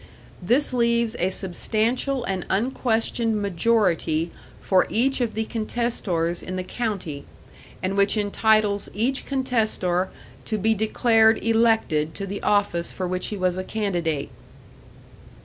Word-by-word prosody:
This 250 Hz, +10 st, +2 dB
leaves 235 Hz, -1 st, +1 dB
a 180 Hz, -, +2 dB
substantial 225 Hz, +8 st, -1 dB
and 190 Hz, -5 st, -2 dB
unquestioned 225 Hz, 0 st, 0 dB
majority 180 Hz, -5 st, +1 dB, 0.3 s
for 185 Hz, -1 st, +2 dB
each 265 Hz, +3 st, +1 dB
of 230 Hz, -3 st, -1 dB
the 220 Hz, 0 st, -1 dB
contestors 215 Hz, -7 st, -2 dB
in 185 Hz, -, -6 dB
the 185 Hz, -, -2 dB
county, 185 Hz, -9 st, -4 dB, 0.6 s
and 190 Hz, +1 st, -1 dB
which 200 Hz, +2 st, +3 dB
entitles 210 Hz, 0 st, +2 dB
each 250 Hz, +6 st, 0 dB
contestor 220 Hz, -9 st, 0 dB, 0.4 s
to 215 Hz, -, -1 dB
be 220 Hz, +2 st, +2 dB
declared 220 Hz, +1 st, +3 dB
elected 225 Hz, -9 st, +2 dB
to 195 Hz, -, -4 dB
the 200 Hz, +1 st, -5 dB
office 200 Hz, -5 st, +1 dB
for 185 Hz, -, -3 dB
which 185 Hz, 0 st, -2 dB
he 210 Hz, -, -4 dB
was 185 Hz, -1 st, 0 dB
a 185 Hz, -, -2 dB
candidate. 175 Hz, -9 st, -2 dB
210 Hz, 130 wpm, -24 LUFS, 185-230 Hz, 0.6 s, which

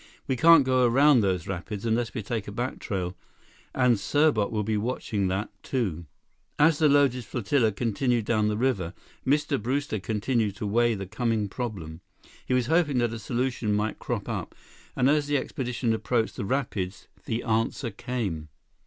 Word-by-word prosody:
"We 130 Hz, -, +1 dB
can't 165 Hz, +1 st, +7 dB
go 130 Hz, -1 st, +3 dB
around 135 Hz, +3 st, +5 dB
those 95 Hz, -4 st, 0 dB
rapids 100 Hz, +3 st, -5 dB
unless 115 Hz, +2 st, 0 dB
we 110 Hz, -, -3 dB
take 110 Hz, 0 st, -3 dB
a -, -, -5 dB
back 120 Hz, +5 st, -3 dB
trail, 90 Hz, -2 st, -3 dB, 0.6 s
and 125 Hz, -3 st, +4 dB
Serbot 140 Hz, -2 st, +2 dB
will 105 Hz, -1 st, -1 dB
be 110 Hz, +1 st, -1 dB
watching 105 Hz, -2 st, -1 dB
that, 95 Hz, +3 st, -2 dB
too." 90 Hz, -, -2 dB, 0.5 s
As 150 Hz, 0 st, +4 dB
the 155 Hz, -2 st, +5 dB
loaded 140 Hz, -3 st, +3 dB
flotilla 115 Hz, +1 st, +1 dB
continued 115 Hz, +2 st, 0 dB
down 110 Hz, -2 st, +2 dB
the 105 Hz, 0 st, 0 dB
river, 100 Hz, -8 st, 0 dB, 0.3 s
Mr. 145 Hz, -1 st, +1 dB
Brewster 130 Hz, -1 st, -1 dB
continued 110 Hz, +1 st, -1 dB
to 110 Hz, -, -5 dB
weigh 115 Hz, +2 st, +2 dB
the 95 Hz, -1 st, -5 dB
coming 110 Hz, +1 st, -1 dB
problem. 95 Hz, -8 st, -6 dB, 0.5 s
He 125 Hz, -, +2 dB
was 125 Hz, -2 st, +2 dB
hoping 160 Hz, -1 st, +2 dB
that 120 Hz, -2 st, +1 dB
a 115 Hz, -, -5 dB
solution 120 Hz, -2 st, -1 dB
might 105 Hz, +1 st, -1 dB
crop -, -, -3 dB
up, -, -, -4 dB, 0.4 s
and 125 Hz, -, +3 dB
as 145 Hz, 0 st, +3 dB
the 145 Hz, 0 st, +2 dB
expedition 125 Hz, -3 st, -2 dB
approached 110 Hz, +1 st, 0 dB
the -, -, -4 dB
rapids, 100 Hz, -6 st, -2 dB, 0.2 s
the 115 Hz, +1 st, -2 dB
answer 115 Hz, +2 st, 0 dB
came. 100 Hz, -9 st, -4 dB
115 Hz, 170 wpm, -27 LUFS, 105-130 Hz, 0.6 s, can't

